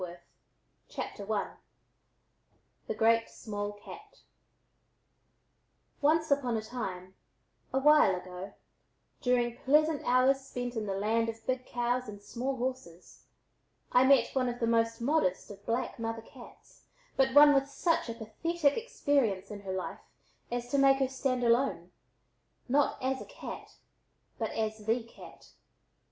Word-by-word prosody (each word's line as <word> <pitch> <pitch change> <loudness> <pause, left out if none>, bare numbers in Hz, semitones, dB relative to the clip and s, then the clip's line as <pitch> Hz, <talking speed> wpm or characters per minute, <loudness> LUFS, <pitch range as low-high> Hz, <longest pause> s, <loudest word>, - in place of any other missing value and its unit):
THE 190 +3 -7 1.4
GREAT 230 +1 +3
SMALL 205 -1 -5
CAT 415 - -13 1.8
Once 315 +1 +2
upon 255 -5 +2
a 215 - -4
time, 190 -6 -6 0.6
a 265 - 0
while 295 -8 +5
ago, 180 +1 -8 0.7
during 240 -1 +1
pleasant 300 +3 +3
hours 260 +2 +3
spent 245 -2 -5
in 215 -2 -3
the 195 - -2
"land 225 +3 +1
of 225 0 -8
big 255 0 -2
cows 245 0 -1
and 205 -1 -8
small 250 +6 -3
horses," 250 -9 -6 0.7
I 250 - +5
met 265 -3 +4
one 255 -2 +1
of 245 0 -5
the 230 - +1
most 230 0 +1
modest 235 - 0
of 200 0 -12
black 235 +1 -2
mother 225 0 -3
cats, 250 0 -16 0.3
but 265 0 +2
one 290 0 +9
with 275 0 +2
such 330 -2 0
a 230 - -4
pathetic 285 +7 0
experience 275 - 0
in 205 -1 -7
her 195 -1 -5
life 185 - -4 0.5
as 245 0 -3
to 280 - +2
make 270 0 +6
her 265 -1 +1
stand 260 -1 -1
alone, 235 -7 +1 0.8
not 280 +3 +2
as 260 0 -1
a - - -7
cat, - - -9 0.6
but - - -1
as 220 -1 -2
the 225 +3 0
cat. 230 - -15
240 Hz, 135 wpm, -30 LUFS, 215-270 Hz, 1.8 s, one